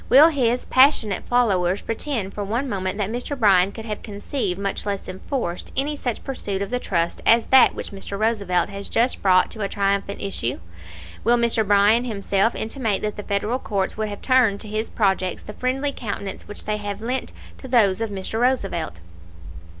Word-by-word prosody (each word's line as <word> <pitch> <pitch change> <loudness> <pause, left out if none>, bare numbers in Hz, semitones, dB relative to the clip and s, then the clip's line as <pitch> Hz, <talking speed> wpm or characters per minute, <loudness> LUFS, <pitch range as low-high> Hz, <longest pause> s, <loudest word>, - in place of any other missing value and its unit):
Will 290 +6 +8
his 250 -5 +1
most - - -12
passionate 255 -6 +4
followers 195 -6 +2
pretend 225 -4 -3
for 205 - -4
one 235 +7 -2
moment 190 -4 -2
that 205 0 -1
Mr. 245 +4 -3
Bryan 195 -5 +4
could 225 +1 -9
have 210 -2 -5
conceived, 205 -2 -3
much 200 -1 -2
less 200 -1 -3
enforced, 185 -1 -4
any 290 +3 +2
such 245 -5 -3
pursuit 200 -7 -3
of 200 - -7
the 250 - 0
trusts 170 -6 -1
as 230 0 +5
that 265 -1 +6
which - - -6
Mr. 200 0 -6
Roosevelt 200 -5 +1
has 200 0 -6
just 240 +3 +1
brought 185 -2 +4
to 220 - -7
a 200 - -1
triumphant 200 0 -1
issue? 130 -11 -3 0.6
Will 240 +2 +4
Mr. 235 -1 +2
Bryan 205 +4 +4
himself 200 -1 0
intimate 220 -3 -2
that 210 0 -2
the 210 - -5
Federal 210 +5 -1
courts 195 -6 -2
would 215 0 -2
have 205 - -8
turned 250 -6 +3
to - - -8
his 215 +1 -2
projects 190 -3 0
the 210 - -8
friendly 265 +5 -1
countenance 200 -6 -5
which 205 - -5
they 215 0 -1
have 205 -1 -5
lent 250 +4 -2 0.3
to 265 - -9
those 220 -5 +3
of 225 - -1
Mr. 200 +2 -4
Roosevelt? 195 - 0
210 Hz, 190 wpm, -22 LUFS, 195-240 Hz, 0.6 s, Will